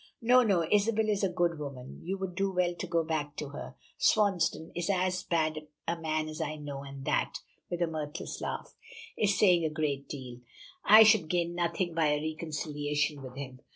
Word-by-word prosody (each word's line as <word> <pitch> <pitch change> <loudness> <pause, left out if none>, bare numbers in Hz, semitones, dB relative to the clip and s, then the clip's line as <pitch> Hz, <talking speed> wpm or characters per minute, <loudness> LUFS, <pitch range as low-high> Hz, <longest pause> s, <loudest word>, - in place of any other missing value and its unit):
"Oh, 250 +1 +7
no. 195 -8 +2
Isabel 215 +1 +3
is 205 -1 +1
a 195 - +3
good 175 -2 0
woman. 135 -3 -7
You 190 +4 -2
would 190 -2 -4
do 195 +1 0
well 180 -1 +1
to 180 +2 -6
go 170 -1 +1
back 155 -2 -2
to 150 - -5
her. 65 - -8 0.2
Swansdown 185 -6 +2
is 175 +2 -3
as 185 -1 +1
bad 155 -2 -1 0.2
a 170 - +1
man 155 -1 -1
as 155 +1 -6
I 155 -1 -2
know, 145 -2 -6
and 135 -1 -9
that," - - 0 0.3
with 175 0 -1
a - - +4
mirthless 155 0 -5
laugh, - - -4 0.4
"is 205 -2 +2
saying 180 -5 +5
a 160 - +1
great 150 -3 -2
deal. 125 -4 -7 0.4
I 215 +2 +9
should 215 -7 +5
gain 175 -1 0
nothing 175 0 -1
by 160 -1 +2
a 150 0 +2
reconciliation 150 -2 -2
with 130 -1 -9
him. 130 -2 -7
165 Hz, 195 wpm, -30 LUFS, 150-180 Hz, 0.4 s, I